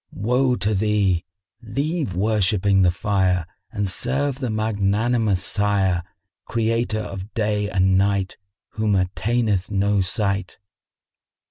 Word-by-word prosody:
Woe 125 +4 +1
to 105 0 0
thee! 100 -4 +1 0.4
Leave 140 - -2
worshipping 100 -1 +2
the 90 - +5
Fire 95 -2 +1 0.3
and 105 -2 -2
serve 135 +7 -1
the 130 -3 -2
Magnanimous 110 -1 0
Sire, 100 -4 +1 0.5
Creator 115 -1 0
of 95 0 -7
day 105 -2 0
and 95 -1 +3
night, 100 -1 0 0.3
whom 110 -2 0
attaineth 100 +1 0
no 100 0 +1
sight." 100 -1 -2
105 Hz, 110 wpm, -22 LUFS, 95-110 Hz, 0.5 s, the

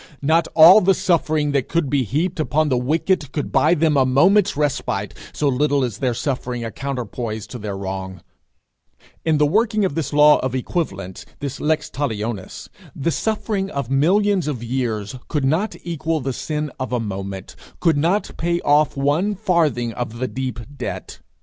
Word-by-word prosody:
Not 160 +3 +3
all 170 +6 +9
the 195 +1 +3
suffering 155 -5 +1
that 140 -2 0
could 170 -3 0
be 140 0 +1
heaped 160 - -1
upon 155 0 +1
the 130 - +2
wicked 155 +3 0
could 145 - -3
buy 160 +3 +4
them 155 -2 +2
a 135 - +5
moment's 180 +9 +3
respite, 135 -9 -1 0.2
so 150 - -1
little 140 +1 +2
is 120 -5 -3
their 125 -3 0
suffering 125 -2 -3
a 115 - -5
counterpoise 120 -4 -4
to 120 +3 -9
their 100 -2 -5
wrong; 95 -1 -5 1.0
in 160 -2 +2
the 150 - +4
working 215 +5 +2
of 185 - -1
this 150 -2 -3
law 150 0 +6
of 130 0 -2
equivalents, 100 - -3
this 140 -1 -5
lex 155 +1 0
talionis, 110 -7 -4 0.3
the 155 +5 -1
suffering 210 -1 -1
of 140 -6 -4
millions 185 +5 +2
of 130 -6 -3
years 115 -3 -2
could 150 -4 -1
not 170 +10 0
equal 165 -1 -2
the 135 -1 -3
sin 150 +2 -3
of 130 -1 -4
a 125 - 0
moment, 95 -3 -6 0.2
could 165 -3 +3
not 170 +8 +1
pay 170 +1 0
off 145 -1 +3
one 155 +9 +1
farthing 155 - +1
of 120 -1 -5
the 130 +2 -2
deep 130 -2 -4 0.2
debt. - - -6
145 Hz, 175 wpm, -21 LUFS, 125-165 Hz, 1.0 s, all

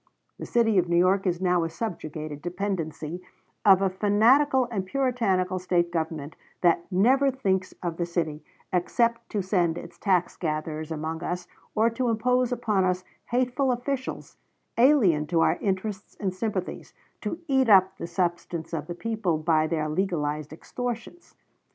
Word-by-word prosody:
The - - -6
city 225 -4 +3
of 175 -1 0
New 170 - +3
York 190 +2 +3
is 175 -1 0
now 180 -2 +2
a 165 - -2
subjugated 155 -5 -5
dependency 175 -3 -3 0.4
of 195 -2 +6
a 195 - +3
fanatical 240 +7 +4
and 195 -4 -1
puritanical 195 -6 0
State 175 -1 +1
government 160 -3 -3 0.3
that 170 +1 +2
never 260 +9 +4
thinks 190 -8 -1
of 170 -2 -3
the 170 - -1
city 160 -3 -2 0.3
except 235 +6 +1
to 205 -3 -1
send 175 -3 +1
its - - -10
tax 180 -4 +1
gatherers 155 -1 -3
among 160 +1 -4
us 175 0 -3 0.3
or 220 +1 +4
to 245 +1 -1
impose 250 +2 +1
upon 220 -6 +1
us 180 0 0 0.2
hateful 255 +2 +1
officials, 260 +2 -4 0.4
alien 225 - +4
to 165 0 +2
our - - +3
interests 195 +1 -3
and 190 -3 -1
sympathies, 190 -2 -4 0.3
to - - -3
eat 265 -4 +3
up 190 -2 +5
the - - -4
substance 170 -1 -2
of 155 -3 -3
the 175 - -5
people 215 -5 -1
by 155 0 +2
their 155 -2 -1
legalized 155 -3 -1
extortions.... 245 - -6
185 Hz, 155 wpm, -26 LUFS, 165-225 Hz, 0.4 s, of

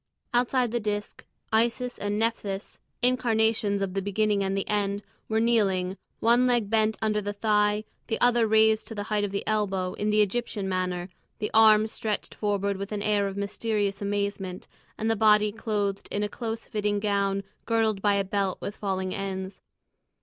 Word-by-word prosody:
Outside 245 0 +2
the 240 - 0
disc, 205 -1 -4 0.3
Isis 240 +2 +1
and 205 0 -1
Nephthys, 210 -3 -2 0.2
incarnations 225 -4 +2
of 190 -2 -3
the 195 - -1
Beginning 205 +1 +1
and 195 0 -1
the 195 - -2
End, 205 -1 0 0.3
were 220 0 +2
kneeling, 195 -5 +2 0.2
one 240 +2 +4
leg 235 -4 +1
bent 220 -1 +2
under 215 -1 +1
the 205 0 -3
thigh, 210 0 +2 0.2
the 225 - -1
other 240 -2 +4
raised 220 0 +4
to 225 - -7
the 205 - -3
height 210 -1 +2
of 205 - 0
the 200 +1 -3
elbow, 195 -4 0
in 210 - -2
the 210 0 +5
Egyptian 205 -2 -2
attitude, 180 -1 -2 0.2
the 210 - -3
arms 220 0 +6
stretched 215 -2 -3
forward 200 -1 -1
with 200 +1 -6
an 205 -1 -2
air 205 -1 +2
of 195 0 -6
mysterious 200 0 -1
amazement, 200 -2 -3 0.3
and 220 - -2
the 225 - +2
body 210 -1 +4
clothed 205 -2 -2
in 205 - -1
a - - +1
close 225 0 -5
fitting 210 -3 -1
gown 200 -1 0 0.2
girdled 220 -3 +1
by 205 0 +3
a 200 - +2
belt 195 -1 -1
with 205 - -5
falling 190 -2 -2
ends. 190 -1 -5
210 Hz, 180 wpm, -27 LUFS, 200-220 Hz, 0.3 s, arms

